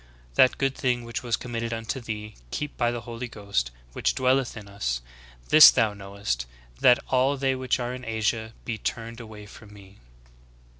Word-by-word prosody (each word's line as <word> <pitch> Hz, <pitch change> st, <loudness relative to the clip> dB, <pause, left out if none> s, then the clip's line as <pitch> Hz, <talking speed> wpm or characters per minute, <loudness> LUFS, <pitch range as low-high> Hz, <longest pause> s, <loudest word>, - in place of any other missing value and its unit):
That 125 Hz, -, +5 dB
good 135 Hz, -1 st, +1 dB
thing 125 Hz, -2 st, 0 dB
which 115 Hz, -1 st, -5 dB
was 120 Hz, -2 st, 0 dB
committed 115 Hz, -1 st, -4 dB
unto 115 Hz, +4 st, -3 dB
thee 105 Hz, -3 st, -6 dB, 0.2 s
keep 150 Hz, -, -4 dB
by 120 Hz, -, +1 dB
the 120 Hz, 0 st, -3 dB
Holy 120 Hz, +1 st, -6 dB
Ghost, 100 Hz, -, -2 dB, 0.2 s
which -, -, 0 dB
dwelleth 130 Hz, -1 st, +1 dB
in 105 Hz, -2 st, -9 dB
us. 60 Hz, -12 st, -2 dB, 0.5 s
This 155 Hz, 0 st, +11 dB
thou 115 Hz, -4 st, +2 dB
knowest, 100 Hz, -12 st, -4 dB, 0.3 s
that 125 Hz, -1 st, +6 dB
all 135 Hz, +2 st, +2 dB
they 135 Hz, 0 st, +1 dB
ivhich 130 Hz, -1 st, -1 dB
are 120 Hz, 0 st, -3 dB
in 125 Hz, 0 st, -7 dB
Asia 110 Hz, 0 st, -1 dB
he 115 Hz, -3 st, -3 dB
turned 115 Hz, +2 st, -4 dB
ais^H^ 110 Hz, -3 st, -10 dB
from 105 Hz, -1 st, -14 dB
me." 100 Hz, -1 st, -15 dB
115 Hz, 180 wpm, -26 LUFS, 105-125 Hz, 0.5 s, This